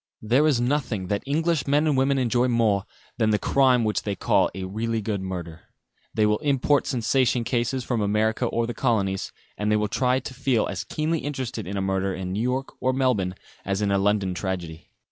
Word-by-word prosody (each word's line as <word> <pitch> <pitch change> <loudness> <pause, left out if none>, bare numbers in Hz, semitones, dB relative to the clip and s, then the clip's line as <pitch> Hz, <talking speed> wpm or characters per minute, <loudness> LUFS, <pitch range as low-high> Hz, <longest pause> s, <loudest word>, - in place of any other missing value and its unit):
There 130 +8 +3
is 140 -6 +3
nothing 120 -7 -1
that 100 - 0
English 160 0 0
men 145 +2 +3
and 150 -3 +2
women 135 +1 +2
enjoy 125 -1 +2
more 110 -5 +2 0.3
than 110 -2 +3
the 105 - +3
crime 130 0 +3
which 110 -1 0
they 100 -2 -3
call - - +2
"a 95 - -4
really 110 +4 -2
good 105 -2 -2
murder." 85 -3 -6 0.5
They 110 - +3
will 105 0 +2
import 140 0 +2
sensation 125 0 +1
cases 120 +2 -1
from 120 -2 -1
America 110 +4 +1
or 115 0 0
the 120 - -4
colonies, 100 -7 0 0.3
and 105 0 0
will 105 - 0
try 125 +5 +1
to 130 - -8
feel 130 -3 +1
as - - -4
keenly 155 +1 -1
interested 130 -8 -4
in 100 +1 -4
a - - 0
murder 95 0 -1
in 90 0 -4
New 105 - -1
York 130 +2 -2
or 130 +1 +2
Melbourne 120 -9 +1 0.3
as 100 +1 -1
in 100 - +1
a 100 - +3
London 100 -2 +1
tragedy. 90 -4 -5
115 Hz, 200 wpm, -25 LUFS, 100-130 Hz, 0.5 s, There